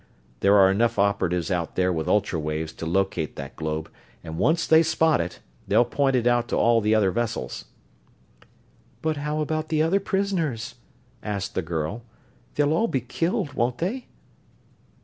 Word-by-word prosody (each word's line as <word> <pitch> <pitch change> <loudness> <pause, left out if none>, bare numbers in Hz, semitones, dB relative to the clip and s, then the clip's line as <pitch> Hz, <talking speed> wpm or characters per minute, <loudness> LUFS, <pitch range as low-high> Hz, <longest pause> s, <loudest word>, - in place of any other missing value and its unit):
There 100 +1 +4
are 95 -1 +6
enough 115 +4 +1
operatives 95 -4 +1
out 85 -3 -2
there 90 0 +2
with 80 -2 -3
ultra 95 -5 +1
waves 75 +1 -3
to 80 - -6
locate 95 -3 -1
that 70 0 -8
globe, 80 0 -3 0.4
and 80 +1 -6
once 160 - +2
they 160 0 +6
spot 160 - +2
it 85 +1 -6 0.3
they'll 120 - +4
point 135 +2 +1
it 120 -2 +1
out 120 -1 +2
to - - -2
all 115 -1 +4
the 105 +1 +2
other 100 -3 +3
vessels." 120 +1 -3 1.4
"But 155 -1 0
how 150 +1 -2
about 155 +1 -2
the 155 -1 +2
other 180 +5 +2
prisoners?" 190 - -1 0.5
asked 100 -2 -4
the - - -1
girl. 80 +6 -3 0.5
"They'll 145 +1 +2
all 225 +8 +2
be 135 - -1
killed, 145 +3 -2
won't 120 0 0
they?" 225 +10 -3
115 Hz, 170 wpm, -25 LUFS, -, 1.4 s, are